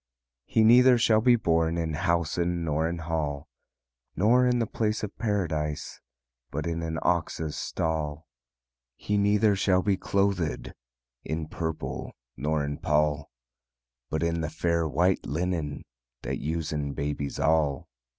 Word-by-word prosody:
"He 110 - +3
neither 125 +2 +7
shall 110 -2 +4
be 125 +1 +5
born 80 -5 +1
In 80 -2 -2
housen, 85 +2 0
nor 80 +1 0
in 85 - -3
hall, 80 -3 -3 0.7
Nor 125 +6 +4
in 125 0 +2
the 115 - +1
place 110 0 -1
of 105 - -5
Paradise, 80 -9 -2 0.5
But - - -4
in 85 0 -2
an 80 -1 -3
ox's 80 -3 0
stall. 80 -1 -2 0.7
"He 105 - -2
neither 105 +1 +3
shall 95 -1 +2
be 100 -2 +2
clothéd 100 -5 -1 0.5
In 80 -1 -3
purple 80 0 -4 0.2
nor 75 +3 -1
in 70 0 -4
pall; 75 -1 +1 0.8
But 80 +1 -1
in 85 0 0
the 80 - -2
fair, 85 0 0
white 90 +6 +1
linen, 80 0 -2 0.4
That - - -3
usen 75 -2 -2
babies 70 0 -3
all. 80 -3 +1
80 Hz, 135 wpm, -27 LUFS, 75-100 Hz, 0.8 s, neither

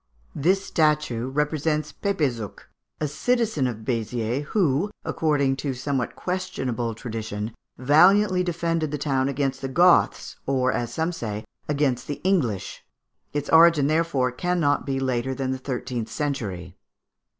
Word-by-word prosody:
This 190 +6 +1
statue 150 -8 +1
represents 150 +1 -1
Pepézuch, 130 - -2 0.4
a 150 - 0
citizen 210 - 0
of 110 -3 -6
Béziers, 120 +2 -1
who, 175 -1 +1 0.2
according 140 -4 +1
to 135 -1 -3
somewhat 130 -1 -2
questionable 130 -11 -3
tradition, 110 -1 -5 0.2
valiantly 180 +8 +5
defended 165 -2 -1
the 150 - -3
town 135 -2 0
against 135 -1 -1
the 135 - -2
Goths, 175 +6 +3
or, 130 -1 +2
as 120 -1 -2
some 160 +6 -1
say, 110 -10 -5 0.2
against 140 -4 0
the 145 - -4
English; 145 - 0 0.5
its 145 0 -3
origin, 165 -3 +7
therefore, 155 -4 +1
cannot 160 0 0
be 135 -1 0
later 130 0 -1
than 130 -1 -2
the 130 - -3
thirteenth 125 -3 -4
century. 100 - -3
140 Hz, 130 wpm, -24 LUFS, 125-160 Hz, 0.5 s, origin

